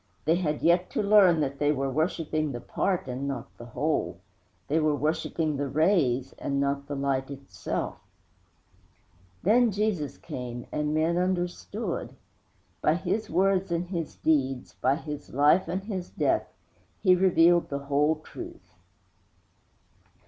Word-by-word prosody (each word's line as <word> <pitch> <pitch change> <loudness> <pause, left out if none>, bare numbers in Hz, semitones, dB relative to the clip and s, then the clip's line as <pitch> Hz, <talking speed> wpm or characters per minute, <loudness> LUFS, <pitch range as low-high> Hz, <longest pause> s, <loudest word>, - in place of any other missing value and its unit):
They 165 +3 +3
had 155 -5 -2
yet 175 +2 +3
to - - 0
learn 200 -6 +6
that 140 -1 -2
they 145 0 +3
were 135 -2 -1
worshiping 155 0 -1
the 120 - -4
part 180 +7 -1
and 130 +2 -3
not 140 -1 -5
the 120 - -9
whole; 155 +5 -1 0.5
they 155 +3 +2
were 155 -1 +2
worshiping 155 +1 -1
the 140 0 -1
rays 140 -4 +2
and 140 0 -1
not 140 0 -1
the 145 - -4
Light 135 -1 -1
Itself. 140 -1 -5 1.4
Then 235 +5 +5
Jesus 195 -9 -1
came, 120 -1 -6
and 150 0 -1
men 160 +2 +2
understood. 180 +2 -2 0.7
By 155 - +3
His 185 +5 -2
words 190 +1 +2
and 170 +1 -1
His 170 -4 -4
deeds, 135 -5 0
by 130 +2 +3
His 150 -3 -7
life 150 +6 +4
and 190 +2 -2
His 190 -4 -5
death, - - 0 0.5
He 185 -3 +6
revealed 175 -2 +4
the 140 - -2
whole 145 +2 +2
truth. 340 -1 -10
155 Hz, 140 wpm, -27 LUFS, 140-180 Hz, 1.4 s, learn